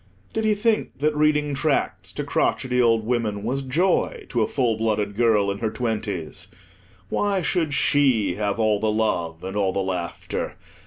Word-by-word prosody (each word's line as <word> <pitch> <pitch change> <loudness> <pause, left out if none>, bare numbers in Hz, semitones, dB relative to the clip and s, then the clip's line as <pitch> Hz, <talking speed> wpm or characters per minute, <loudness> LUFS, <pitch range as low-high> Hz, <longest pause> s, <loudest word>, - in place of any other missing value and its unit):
Did 220 - -1
he 215 -1 +3
think 220 +1 0
that 150 +2 +1
reading 150 -1 +2
tracts 140 +1 0
to - - -3
crotchety 125 -1 +1
old 115 -2 +3
women 110 -4 -1
was 130 +5 -1
joy 165 +8 0
to 120 - 0
a 110 - +2
full 120 -5 +1
blooded 105 -2 0
girl 105 -3 +3
in 100 - -5
her 110 - 0
twenties? 105 -8 -3 0.6
Why 200 -3 0
should 165 -4 0
she 130 -12 +3
have 105 +2 -2
all 110 -2 +2
the 110 - +1
love, 85 -7 -1
and 95 +1 -5
all 100 -2 +1
the - - -1
laughter? 90 -3 -3
115 Hz, 170 wpm, -24 LUFS, 105-145 Hz, 0.6 s, he